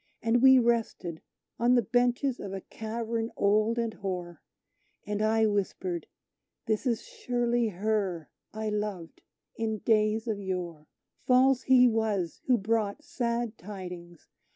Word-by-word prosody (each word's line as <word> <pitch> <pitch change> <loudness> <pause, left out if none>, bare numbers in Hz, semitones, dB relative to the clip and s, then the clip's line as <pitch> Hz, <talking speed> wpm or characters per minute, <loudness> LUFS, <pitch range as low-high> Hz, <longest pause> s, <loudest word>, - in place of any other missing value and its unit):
And 230 +1 +3
we 265 0 +8
rested 230 -8 0 0.4
on 240 +2 +4
the 240 - +3
benches 245 +4 +1
of 195 -1 -6
a 195 - -4
cavern 225 +2 -4
old 215 +3 +2
and 230 -2 -1
hoar; 180 -4 -5 0.6
And 210 0 -2
I 220 +1 +3
whispered, 190 -4 -2 0.6
"this 220 +3 -1
is 235 -2 0
surely 240 - -1
her 195 -4 -1 0.2
I 220 0 -3
loved 210 -5 -4 0.4
in 220 -1 -1
days 215 +1 +1
of 215 -3 -1
yore! 175 -5 -4 0.4
False 255 0 +5
he 255 -1 +6
was 215 -7 -1
who 250 -2 +5
brought 220 +5 -1
sad 235 -3 -2
tidings! 180 -4 -9
220 Hz, 130 wpm, -29 LUFS, 195-235 Hz, 0.6 s, we